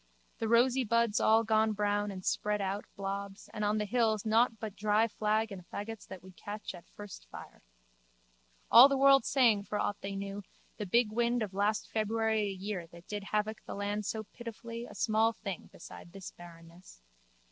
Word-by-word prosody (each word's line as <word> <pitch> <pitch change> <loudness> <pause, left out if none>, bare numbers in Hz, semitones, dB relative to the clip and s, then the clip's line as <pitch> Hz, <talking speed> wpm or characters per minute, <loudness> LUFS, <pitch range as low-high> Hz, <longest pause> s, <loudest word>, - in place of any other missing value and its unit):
The 225 - -1
rosy 245 +3 +4
buds 230 -1 +2
all 225 +1 +4
gone 220 0 +2
brown 205 0 0
and 185 -2 -7
spread 210 0 0
out 195 +1 -2
blobs 195 0 -5
and 210 - -3
on 210 +1 +2
the 210 - 0
hills 220 -1 +1
nought 225 +1 +3
but 215 -3 -6
dry 215 +2 +2
flag 215 0 0
and 190 -2 -8
faggots 220 +1 -6
that 185 -2 -9
would 185 -1 -14
catch 210 +2 -6
at 175 -2 -13
first 200 - -11
fire. - - -11 1.1
All 255 +4 +10
the 275 - +1
world 275 -2 +6
saying, 230 -7 +3
for 210 - -3
aught 205 -1 -2
they 195 0 -4
knew, 200 +1 -5 0.4
the 210 -2 -4
big 230 +3 +3
wind 235 +1 +1
of 200 -3 -6
last 205 +2 0
February 220 0 0
a 205 -1 -1
year 190 -2 -5
that 170 +1 -15
did 205 -1 -5
havoc 215 +1 -2
the - - -6
land 205 +1 -2
so 220 -1 -2
pitifully 230 +1 -8
a - - -12
small 220 +1 +2
thing 195 -5 -6
beside 170 0 -12
this 195 -2 -8
barrenness. 170 - -15
210 Hz, 190 wpm, -32 LUFS, 200-225 Hz, 1.1 s, All